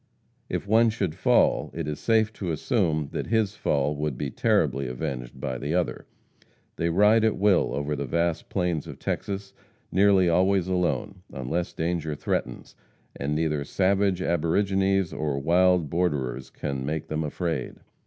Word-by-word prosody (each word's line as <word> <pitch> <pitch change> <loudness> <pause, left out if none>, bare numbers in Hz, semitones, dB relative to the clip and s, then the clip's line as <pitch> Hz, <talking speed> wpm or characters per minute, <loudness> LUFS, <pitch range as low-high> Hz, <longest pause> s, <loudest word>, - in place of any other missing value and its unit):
If - - -3
one 115 +2 +5
should 100 -7 -2
fall, - - +2
it 80 -2 -3
is 75 -1 -4
safe 110 -1 +2
to 95 -4 -5
assume 80 - 0
that - - -3
his 110 -3 +1
fall 75 -3 0
would 75 -3 -2
be 70 -1 -3
terribly 70 +2 +1
avenged 60 -1 -5
by 65 -2 -3
the 75 +5 -2
other. 90 -1 -1 0.7
They 85 - 0
ride 105 +6 +4
at 110 -2 +2
will 100 -1 +3
over 70 +1 -2
the 70 -1 -4
vast 85 +3 -1
plains 90 -5 -1
of - - -8
Texas, 100 0 -4 0.4
nearly 95 -1 +4
always 95 +1 +3
alone, 90 0 -1
unless 70 +7 -3
danger 80 -2 -2
threatens, - - -3 0.4
and 75 +2 -2
neither 75 -2 0
savage 95 +3 +1
aborigines 95 +3 +1
or 75 -2 -2
wild 90 +3 +3
borderers 70 -8 -1
can 70 -3 -4
make 75 +3 -3
them 80 +1 -2
afraid. 80 -3 -3
85 Hz, 155 wpm, -26 LUFS, 75-95 Hz, 0.7 s, one